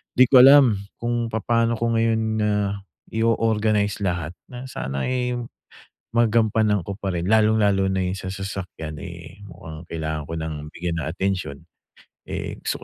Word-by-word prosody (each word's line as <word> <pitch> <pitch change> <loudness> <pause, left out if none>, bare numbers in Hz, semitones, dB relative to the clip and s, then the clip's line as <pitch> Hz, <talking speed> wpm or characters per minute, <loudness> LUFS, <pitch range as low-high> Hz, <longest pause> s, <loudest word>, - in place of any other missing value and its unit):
di 130 - +7
ko 130 -1 +7
alam 135 -5 +8 0.2
kung 120 0 -1
papaano 115 +1 +1
ko 115 0 0
ngayon, 115 0 +2 0.2
ah, 100 -1 0 0.3
i-o-organize 110 -2 +1
lahat 85 -3 -2 0.2
na 125 +1 -7
sana, 65 - -3
eh, 125 -1 -1 0.8
magampanan 110 -3 +3
ko 100 - -5
pa 100 -3 -3
rin 85 +1 -2
lalong-lalo 105 -3 +3
na 95 -1 0
yung 90 +1 -2
sa 95 0 -5
sasakyan, 95 -5 -6
eh, 85 +4 -10
mukhang 80 -2 -10
kailangan 80 -2 -3
ko - - -4
ng 80 0 -4 0.2
bigyan 85 -1 -3
ng - - -4
atensyon. 90 -5 -2 0.7
Eh, - - -5
gusto - - -3
100 Hz, 150 wpm, -23 LUFS, 85-115 Hz, 0.8 s, alam